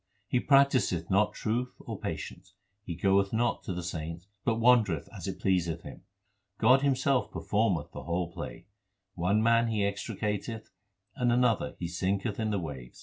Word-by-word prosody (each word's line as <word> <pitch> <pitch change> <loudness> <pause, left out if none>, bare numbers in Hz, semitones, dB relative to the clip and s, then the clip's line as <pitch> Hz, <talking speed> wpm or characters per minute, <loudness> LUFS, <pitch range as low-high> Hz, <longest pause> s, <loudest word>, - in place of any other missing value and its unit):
He 125 - +1
practiseth 130 - +3
not 100 +2 +3
truth 120 +3 -2
or - - -7
patience; 95 0 -6 0.3
he 85 -4 -6
goeth 100 +2 +2
not 115 +1 +1
to - - -3
the 90 0 -4
saints, 85 0 -5 0.2
but 115 - +1
wander 115 -5 +4
eth - - -11
as - - -6
it - - -4
pleaseth 85 -3 0
him. - - -10 0.6
God 125 +5 +5
Himself 130 -5 +2
performeth 100 -11 0
the - - -8
whole 85 0 -1
play; 85 - -7 0.5
One 100 +5 +1
man 115 0 +4
He 110 -2 0
extricateth 105 +2 -3 0.4
and 120 -1 +1
another 120 -2 +2
He 85 - -3
sinketh 95 +5 -1
in 110 -1 0
the 105 - 0
wave. 70 -8 -6
100 Hz, 165 wpm, -29 LUFS, 90-115 Hz, 0.6 s, God